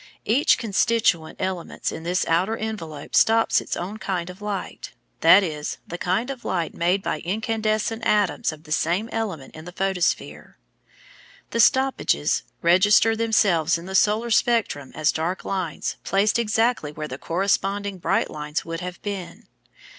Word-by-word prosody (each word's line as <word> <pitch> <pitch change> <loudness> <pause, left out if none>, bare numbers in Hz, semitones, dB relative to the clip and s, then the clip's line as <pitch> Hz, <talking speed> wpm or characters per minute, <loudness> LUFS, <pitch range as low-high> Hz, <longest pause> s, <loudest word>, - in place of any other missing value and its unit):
Each 250 +7 +3
constituent 205 -6 +1
element 185 -2 -3
in - - -7
this 175 +2 0
outer 185 +7 +1
envelope 165 -10 -5
stops 225 0 +4
its - - -4
own 195 +5 -5
kind 185 -3 -3
of 185 +3 -16
light, 205 -3 -5 0.3
that 180 +5 +7
is, 150 -4 -4
the 175 - -6
kind 195 +10 0
of 255 -3 -8
light 170 -3 -2
made 180 +3 0
by - - -2
incandescent 220 +3 -1
atoms 210 -6 +1
of 155 0 -12
the 155 - -14
same 175 +8 0
element 195 -12 -4
in 155 0 -11
the 180 - -8
photosphere. 180 - -2 0.9
The 230 - -2
"stoppages" 265 +4 +2 0.2
register 205 +6 +5
themselves 195 -8 +2
in 170 - -10
the 190 - -7
solar 215 +4 +2
spectrum 220 - +1
as 155 -1 +2
dark 170 +4 -3
lines 185 -5 -3
placed 205 +4 +2
exactly 225 -7 +1
where 150 0 -6
the 130 -1 -7
corresponding 195 +2 -1
bright - - 0
lines 150 0 -4
would 165 0 -4
have 180 0 -6
been. 195 0 -6
190 Hz, 155 wpm, -23 LUFS, 165-220 Hz, 0.9 s, that